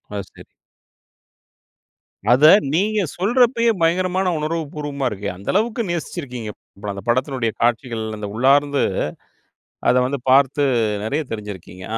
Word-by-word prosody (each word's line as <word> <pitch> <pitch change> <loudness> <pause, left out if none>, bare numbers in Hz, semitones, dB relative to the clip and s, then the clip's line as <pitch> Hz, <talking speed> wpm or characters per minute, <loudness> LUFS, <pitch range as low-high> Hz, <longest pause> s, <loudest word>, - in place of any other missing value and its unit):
ஆ, - - -2
சரி. - - -15 1.9
அத 130 +5 +4 0.3
நீங்க 210 +5 +1 0.2
சொல்றப்பயே 235 +3 +3
பயங்கரமான 185 +2 +1
உணர்வு 160 +2 -2
பூர்வமா 145 -3 -3
இருக்கே. 100 -1 -5
அந்த 95 +2 -14
அளவுக்கு 230 +3 +1
நேசிச்சுருக்கீங்க. 125 -10 -4 0.4
அந்த 100 - -8
படத்தினுடைய 130 -2 0
காட்சிகள், 115 -1 0
அந்த 105 -1 -5
உள்ளார்ந்து, 140 +3 +3 1.1
அத - - +3
வந்து 135 -1 -3
பார்த்து, 140 +2 +4 0.4
நிறைய 145 +8 -1
தெரிஞ்சுருக்கீங்க. 95 -4 -8
140 Hz, 110 wpm, -21 LUFS, 115-175 Hz, 1.9 s, அத